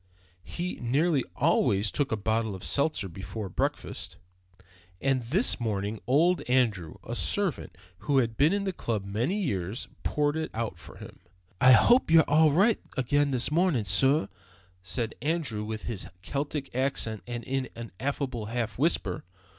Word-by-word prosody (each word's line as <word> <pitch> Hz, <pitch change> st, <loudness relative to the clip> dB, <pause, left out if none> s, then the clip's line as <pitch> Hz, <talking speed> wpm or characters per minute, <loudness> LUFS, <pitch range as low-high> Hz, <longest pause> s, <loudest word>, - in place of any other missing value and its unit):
He 180 Hz, +1 st, -5 dB
nearly 140 Hz, +4 st, +2 dB
always 100 Hz, +1 st, +2 dB
took 145 Hz, -, -1 dB
a 110 Hz, -, +1 dB
bottle 110 Hz, 0 st, -1 dB
of 95 Hz, -, -10 dB
seltzer 140 Hz, -8 st, 0 dB
before 95 Hz, +3 st, -7 dB
breakfast, -, -, -3 dB, 0.8 s
and 135 Hz, -2 st, +1 dB
this 155 Hz, -, +1 dB
morning 105 Hz, -2 st, -2 dB
old 165 Hz, +8 st, +3 dB
Andrew 105 Hz, -11 st, +1 dB
(a 120 Hz, -, -6 dB
servant 190 Hz, -, 0 dB, 0.2 s
who 145 Hz, -2 st, 0 dB
had 115 Hz, -4 st, +1 dB
been 145 Hz, +6 st, +4 dB
in 200 Hz, 0 st, 0 dB
the 190 Hz, -1 st, -2 dB
club 110 Hz, -, -3 dB
many 120 Hz, -, -1 dB
years) 105 Hz, -, -2 dB
poured 145 Hz, 0 st, 0 dB
it 160 Hz, 0 st, -2 dB
out 110 Hz, -7 st, -3 dB
for -, -, -12 dB
him. -, -, -12 dB, 0.4 s
"I 130 Hz, 0 st, +8 dB
hope 240 Hz, -, +5 dB
you're 165 Hz, 0 st, +7 dB
all 155 Hz, +1 st, +5 dB
right 200 Hz, +9 st, +3 dB, 0.2 s
again 145 Hz, +3 st, +2 dB
this 130 Hz, 0 st, +1 dB
mornin', 160 Hz, -, +2 dB
sorr," 100 Hz, -, +4 dB, 0.5 s
said 110 Hz, +5 st, -2 dB
Andrew 145 Hz, -8 st, -1 dB
with 110 Hz, 0 st, -5 dB
his 110 Hz, -5 st, -4 dB, 0.2 s
Celtic 140 Hz, +2 st, -4 dB
accent 125 Hz, -5 st, 0 dB
and 120 Hz, -1 st, -5 dB
in 135 Hz, +1 st, -2 dB
an 115 Hz, -1 st, -8 dB
affable 130 Hz, -4 st, -3 dB
half 115 Hz, -1 st, -3 dB
whisper. 130 Hz, -, 0 dB
125 Hz, 155 wpm, -28 LUFS, 110-150 Hz, 0.8 s, I